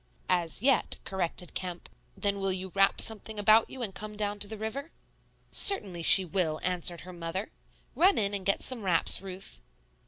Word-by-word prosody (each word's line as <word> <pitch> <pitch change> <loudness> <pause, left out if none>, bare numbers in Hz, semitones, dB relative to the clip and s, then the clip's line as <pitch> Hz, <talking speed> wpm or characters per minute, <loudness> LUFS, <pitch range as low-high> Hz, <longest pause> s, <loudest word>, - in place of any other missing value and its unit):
"As 175 +2 -1
yet," 270 -1 0
corrected 180 -2 -5
Kemp. 180 -2 -7 0.3
"Then 200 -1 -2
will 195 0 -1
you 185 0 -5
wrap 195 0 +2
something 220 0 0
about 215 +2 +3
you 260 - -8
and 200 -4 -5
come 210 +1 -10
down 205 -1 -4
to 205 - -3
the 220 +1 -9
river?" 245 +8 -7 0.6
"Certainly 195 - +1
she 185 +3 +10
will," 165 -3 0
answered 180 -1 0
her 180 0 -12
mother; 175 +4 -6 0.4
"run 380 +3 +3
in 200 -1 -1
and 200 -2 -4
get 195 +1 0
some 255 -3 +2
wraps, 180 -3 +1
Ruth." 185 - -9
195 Hz, 180 wpm, -27 LUFS, 180-215 Hz, 0.6 s, she